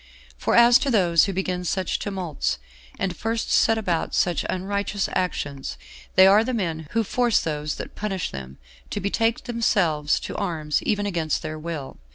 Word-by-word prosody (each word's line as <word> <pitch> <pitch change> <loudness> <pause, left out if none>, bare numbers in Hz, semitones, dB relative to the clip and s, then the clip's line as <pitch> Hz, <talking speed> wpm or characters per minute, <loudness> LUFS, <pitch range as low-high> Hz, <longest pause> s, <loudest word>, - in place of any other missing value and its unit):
For - - 0
as 235 +1 +7
to 275 - -1
those 175 - +4
who 195 - -2
begin 180 -1 -2
such 185 +2 -1
tumults, 180 - -2 0.4
and 185 -2 -2
first 225 +3 -2
set 225 - +4
about 180 -7 -1
such 175 -2 +1
unrighteous 200 +2 -1
actions, 145 -6 -2 0.4
they 190 - +8
are 200 +3 +6
the 255 +1 -2
men 165 -7 -2
who 230 0 +2
force 240 +2 +2
those 150 -1 -3
that - - -7
punish 195 -4 -3
them 65 0 -8 0.3
to - - -3
betake 225 +4 0
themselves 180 - +1
to - - -6
arms 160 -6 -1
even 205 -1 0
against 170 -6 -1
their 155 0 -5
will. 155 -4 -6
185 Hz, 170 wpm, -24 LUFS, 160-210 Hz, 0.4 s, they